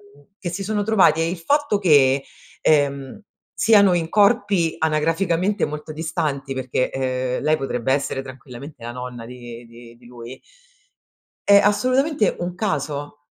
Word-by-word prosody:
mhmm, 145 0 -22
che 175 - -4
si 190 +3 -5
sono 210 +1 -1
trovati, 190 -7 +3
e 165 - 0
il 180 - -4
fatto 280 - +1
che, 140 -6 +4 0.4
ehm, 140 +3 +1 0.4
siano 200 -4 +5
in 165 -2 -1
corpi 200 -5 +2
anagraficamente 165 +5 0
molto 150 +1 -7
distanti, 150 -4 -3
perché, 130 -1 -2
uhm, 130 -1 -2
lei 155 +2 +2
potrebbe 130 -2 -1
essere 135 -1 -2
tranquillamente 130 +1 -11
la 120 - -5
nonna 125 -1 -7
di 120 -1 -10
di 115 0 -15
di 120 0 -21
lui 120 +1 -11 1.1
è 200 0 +8
assolutamente 255 - +1
un 175 0 -4
caso, 145 -7 -4
150 Hz, 145 wpm, -21 LUFS, 130-190 Hz, 1.1 s, è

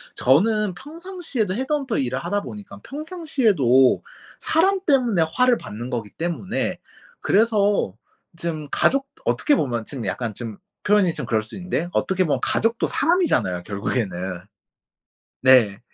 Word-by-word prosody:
저는 205 - +3
평상시에도 315 - -4
헤드헌터 265 +1 -1
일을 130 -1 -1
하다 205 +8 -1
보니까 205 -1 -9
평상시에도 255 - +2 0.4
사람 380 +5 +2
때문에 245 - +3
화를 250 -1 +4
받는 120 +4 -7
거기 115 -5 -4
때문에 175 +6 -3 0.4
그래서 205 - +2 0.4
좀 160 -3 -4
가족 275 +1 +2 0.2
어떻게 295 - +2
보면 120 - -1
좀 130 -5 -6
약간 115 -4 -3
좀 115 -2 -7 0.3
표현이 200 -5 +3
좀 150 - -4
그럴 110 -1 +1
수 110 - -9
있는데 180 -2 -3
어떻게 190 -1 +1
보면 150 - +1
가족도 230 +1 +1
사람이잖아요, 275 - +1
결국에는. 95 -3 -3 1.0
네. 120 -6 +5
185 Hz, 305 characters per minute, -22 LUFS, -, 1.0 s, 네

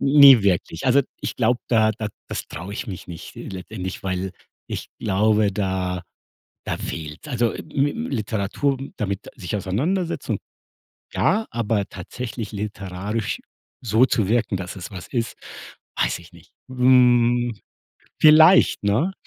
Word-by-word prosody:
Ne 140 -4 +8
wirklich. 90 -3 0
Also 130 +2 +5 0.2
ich - - -4
glaube, 120 +1 +2
da 110 -2 +4
da 110 0 -4 0.2
das - - -4
traue 90 +4 -7
ich 105 - -5
mich 95 -5 -7
nicht, 85 -2 -9
äh, - - -7
letztendlich, 95 0 -6
weil 95 0 -2 0.3
ich - - -5
glaube, 105 +1 +2
da 95 -2 -2 0.6
da - - -2
fehlt's. 80 - -6
Also 120 -3 +1
ä - - -6
mi 140 +1 +2
Literatur 125 - -1
m 135 - -8
damit 100 -2 -3
sich 100 -1 -4
auseinandersetzen 150 - -1
un - - -1 0.7
ja, 220 +1 +2
aber 115 -3 0
tatsächlich 110 +4 -6
literarisch 100 +1 -4 0.4
so 115 +1 +4
zu 105 -7 +1
wirken, 110 -3 +1
dass 90 +1 -6
es 90 - -7
was 90 -4 -9
ist, 115 -3 -2 0.6
weiß - - +1
ich - - -16
nicht. - - -18 0.2
Hm, 120 -2 +4 0.7
vielleicht, 160 - +7
ne? 115 - +1
110 Hz, 145 wpm, -23 LUFS, 95-125 Hz, 0.7 s, Ne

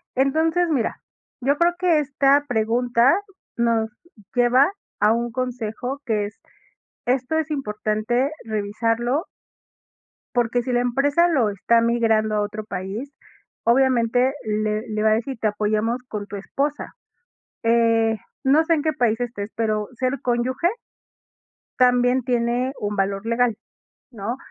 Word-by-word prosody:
Entonces, 320 +6 +2
mira, 265 -8 -1 0.4
yo 280 +3 +2
creo 345 +2 +3
que 345 -4 +3
esta 280 0 +2
pregunta 240 +2 +2 0.4
nos 230 -2 +1 0.5
lleva 250 +6 +4 0.3
a 210 +1 +4
un 235 0 -2
consejo 250 +1 -4
que 215 -3 0
es, 205 +1 -10 0.7
esto 255 +4 0
es 320 -1 -1
importante 220 0 -1
revisarlo 230 - -1 1.1
porque 240 0 +1
si 250 0 -2
la 245 - +3
empresa 280 +7 +2
lo 265 -11 +2
está 230 +4 +2
migrando 225 -2 +2
a 210 - +1
otro 210 +1 -4
país, 205 +7 -5 0.5
obviamente, 250 0 +3
le 215 0 0
le 215 0 -1
va 220 - +4
a - - +5
decir: 240 +3 -3
"Te 220 - +1
apoyamos 215 +3 0
con 210 -1 -4
tu 205 - -7
esposa". 285 +8 -3 0.7
Eh, 230 -1 +3 0.3
no 290 +4 +5
sé 330 - +3
en 295 - -1
qué 315 -1 +1
país 230 -3 +1
estés, 220 -3 -4
pero 215 -2 -1
ser 255 +2 -1
cónyuge 250 +6 0 1.1
también 250 0 +4
tiene 245 +2 0
un 205 0 -2
valor 195 +1 -1
legal, 230 -1 +1 0.6
¿no? 230 +1 -4
240 Hz, 135 wpm, -22 LUFS, 215-265 Hz, 1.1 s, a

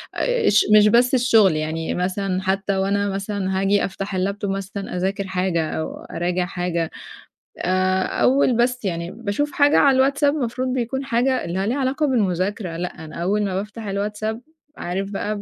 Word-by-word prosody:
آآ، - - 0
أش 210 - +5
مش 210 0 +6
بس 240 +4 +4
الشُغل، 220 -8 +4
يعني 160 +1 -2
مثلًا 185 +1 -1
حتى 195 +1 0
وأنا 200 +1 0
مثلًا 195 -1 -2
هاجي 200 +1 +2
أفتح 195 0 -4
الlaptop 200 +2 -2
مثلًا 195 0 -4
أذاكر 195 +2 -2
حاجة 180 -4 -1
أو 160 - -4
أراجع 175 +1 -2
حاجة 175 -2 -2 0.7
آآ، 185 +1 +1
أول 260 -2 +2
بس 245 -1 +1
يعني 170 -1 -3
باشوف 235 +6 -2
حاجة 290 0 +4
على 275 -2 +5
الواتساب، 280 +2 +3
المفروض 255 -2 -2
بيكون 265 +2 -2
حاجة 255 +2 +1
اللي 190 +4 -2
ليها 250 +5 0
علاقة 275 +3 0
بالمذاكرة، 190 -5 -1
لأ، 170 -2 -5
أنا 155 - -10
أول 205 +3 +1
ما 190 -1 -2
بافتح 210 +3 -5
الواتساب 210 +3 -3 0.4
عارف 195 +3 -3
بقى 205 +1 -2
ب - - -7
200 Hz, 165 wpm, -22 LUFS, 185-235 Hz, 0.7 s, مش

